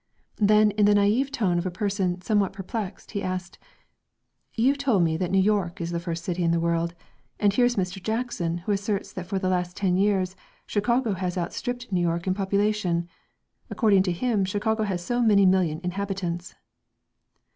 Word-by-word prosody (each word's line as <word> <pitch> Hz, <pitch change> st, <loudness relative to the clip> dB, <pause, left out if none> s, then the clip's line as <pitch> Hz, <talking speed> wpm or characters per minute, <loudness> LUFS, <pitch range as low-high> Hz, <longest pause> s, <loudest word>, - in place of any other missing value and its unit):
Then 210 Hz, 0 st, +5 dB
in 205 Hz, 0 st, +3 dB
the 205 Hz, -, +5 dB
naïve 210 Hz, +7 st, +3 dB
tone 200 Hz, -11 st, 0 dB
of 175 Hz, -, -4 dB
a -, -, 0 dB
person, 185 Hz, -1 st, -1 dB
somewhat 205 Hz, -1 st, +1 dB
perplexed, 195 Hz, +1 st, -6 dB
he 200 Hz, -, -3 dB
asked: 185 Hz, -2 st, -4 dB, 1.0 s
"You 255 Hz, +5 st, +3 dB
told 260 Hz, -10 st, +2 dB
me 160 Hz, -1 st, +1 dB
that 180 Hz, 0 st, -1 dB
New 195 Hz, -, +2 dB
York 195 Hz, -3 st, +1 dB
is 170 Hz, 0 st, -3 dB
the 170 Hz, -, -1 dB
first 170 Hz, -1 st, -4 dB
city 180 Hz, -1 st, -1 dB
in 170 Hz, -, +2 dB
the 170 Hz, 0 st, +2 dB
world. 170 Hz, 0 st, 0 dB, 0.4 s
And 205 Hz, -1 st, +3 dB
here 245 Hz, +3 st, +4 dB
is 245 Hz, 0 st, +1 dB
Mr. 185 Hz, 0 st, -2 dB
Jackson 220 Hz, -6 st, -2 dB
who -, -, 0 dB
asserts 200 Hz, 0 st, -2 dB
that 180 Hz, -1 st, -6 dB
for 195 Hz, -, -2 dB
the 190 Hz, -1 st, -1 dB
last 180 Hz, -1 st, -1 dB
ten 185 Hz, -3 st, +1 dB
years 190 Hz, -2 st, +1 dB, 0.3 s
Chicago 235 Hz, +2 st, +1 dB
has 180 Hz, -1 st, -3 dB
outstripped 245 Hz, +7 st, -4 dB
New 180 Hz, -2 st, +1 dB
York 170 Hz, 0 st, 0 dB
in 185 Hz, -, +1 dB
population. 195 Hz, -3 st, 0 dB, 0.6 s
According 205 Hz, -5 st, +3 dB
to 185 Hz, -1 st, 0 dB
him 210 Hz, +3 st, 0 dB
Chicago 215 Hz, +3 st, 0 dB
has 180 Hz, -3 st, -3 dB
so 245 Hz, +3 st, 0 dB
many 205 Hz, -4 st, +5 dB
million 185 Hz, -4 st, +2 dB
inhabitants." 180 Hz, -2 st, -3 dB
195 Hz, 185 wpm, -25 LUFS, 180-210 Hz, 1.0 s, Then